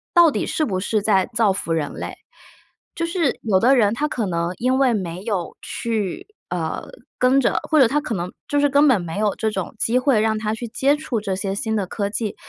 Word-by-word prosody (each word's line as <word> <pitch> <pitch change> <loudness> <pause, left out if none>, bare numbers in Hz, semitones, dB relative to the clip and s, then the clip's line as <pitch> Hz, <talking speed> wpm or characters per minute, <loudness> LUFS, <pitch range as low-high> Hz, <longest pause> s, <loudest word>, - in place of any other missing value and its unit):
到 340 -2 +7
底 - - -1
是 310 - 0
不 190 -7 -2
是 215 +3 0
在 195 -2 +2
造 220 -4 +3
福 170 - -4
人 155 -3 -2
类。 - - -6 0.8
就 335 - -1
是 335 -4 0
有 200 -4 +3
的 255 +6 +5
人 210 -4 +3
他 295 +6 -1
可 240 -7 -2
能 170 -2 -1
因 255 +2 +1
为 260 -3 +4
没 180 -3 -4
有 195 -7 -3
去， 230 - -3 0.2
呃， - - -3 0.3
跟 255 +2 +4
着 - - +1
或 310 - +4
者 260 - +7
他 295 +5 0
可 255 -7 -3
能 175 0 -4 0.2
就 290 - +1
是 290 - +4
根 285 +2 +5
本 255 -7 +4
没 170 +3 -5
有 210 -1 +1
这 220 -1 -1
种 190 0 -4
机 240 +3 +2
会 255 -3 +3
让 220 0 +1
他 215 0 -1
去 235 +2 -6
接 270 +5 +2
触 255 -7 -3
这 195 -2 -2
些 195 0 -3
新 220 0 -2
的 205 -3 0
科 200 +1 -2
技， 215 0 -3
220 Hz, 250 characters per minute, -21 LUFS, 195-270 Hz, 0.8 s, 到